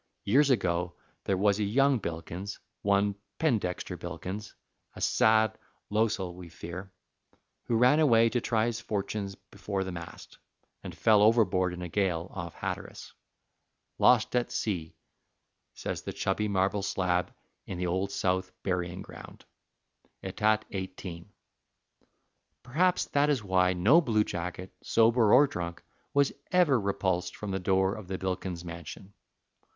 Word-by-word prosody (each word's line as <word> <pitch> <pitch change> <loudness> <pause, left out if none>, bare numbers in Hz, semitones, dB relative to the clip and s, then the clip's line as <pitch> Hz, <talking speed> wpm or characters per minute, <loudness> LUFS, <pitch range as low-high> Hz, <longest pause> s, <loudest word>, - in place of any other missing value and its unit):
Years 140 +7 +4
ago 90 -7 +1 0.3
there 95 - +1
was 100 +1 +2
a - - +1
young 135 +5 +3
Bilkins, 85 +3 -5 0.2
one 100 0 +2 0.2
Pendexter 110 - -1
Bilkins 100 +3 -6 0.4
a - - -9
sad 110 0 +3 0.3
losel, 105 -4 0
we 90 -1 -11
fear 90 +4 -8 0.7
who 120 - 0
ran 125 +6 +5
away 115 -7 +5
to 120 +1 -1
try 115 -2 +1
his 120 -1 -2
fortunes 100 -3 -3
before 100 0 -5
the 95 - -5
mast, 85 -1 -10 0.4
and - - -8
fell 110 -2 +5
overboard 105 -5 +4
in 90 0 -6
a - - -4
gale 90 -1 -1
off 85 -3 -6
Hatteras. - - -6 0.9
"Lost 125 -1 +4
at 120 -1 +1
sea," 85 -7 -3 0.8
says - - -4
the - - -6
chubby 100 +2 -1
marble 100 0 +1
slab 90 -2 0 0.4
in 95 - -5
the 90 - -2
Old 95 +3 -1
South 95 -1 0
Burying 90 -1 -2
Ground, - - -12 0.8
"ætat. 105 +3 +1
18." 95 -1 -6 1.3
Perhaps 175 +9 +2
that 145 +1 +2
is 135 -7 +1
why 95 -1 +3
no 110 - +5
blue 110 -8 +2
jacket, 90 0 -5
sober 115 -1 +4
or 140 +4 +8
drunk, 85 -9 -5 0.3
was 140 -1 +2 0.2
ever 175 -8 +4
repulsed 95 -2 -1
from 105 -2 -5
the 95 - -1
door 95 +1 +2
of 105 -4 -8
the 95 0 -3
Bilkins 90 -2 -4
mansion. 85 +3 -9
100 Hz, 140 wpm, -29 LUFS, 90-110 Hz, 1.3 s, or